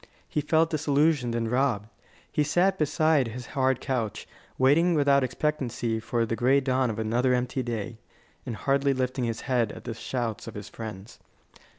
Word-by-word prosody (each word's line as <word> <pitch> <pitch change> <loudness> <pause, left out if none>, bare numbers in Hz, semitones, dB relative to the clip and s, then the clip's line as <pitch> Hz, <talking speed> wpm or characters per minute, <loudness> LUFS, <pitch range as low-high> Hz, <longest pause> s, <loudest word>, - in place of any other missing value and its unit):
He 150 - -1
felt 160 +2 +2
disillusioned 145 -4 +2
and 115 -1 -1
robbed. 125 -5 +1 0.4
He 150 - +2
sat 180 +6 +2
beside 155 -2 +2
his 120 +2 -7
hard 130 -2 +2
couch, 120 -6 -3 0.3
waiting 160 +7 +4
without 140 -2 +4
expectancy 125 -4 -1
for 115 0 -1
the 115 - -2
gray 130 +4 +3
dawn 130 -2 +1
of 110 - -4
another 120 +4 +1
empty 125 +1 -1
day, 115 -2 -4 0.4
and 115 - -5
hardly 140 +3 +1
lifting 130 -1 -1
his 115 -1 -3
head 120 -5 0
at - - -10
the 115 - -4
shouts 115 -1 -4
of - - -8
his 105 0 -7
friends. 110 0 -8
130 Hz, 170 wpm, -27 LUFS, 115-140 Hz, 0.4 s, waiting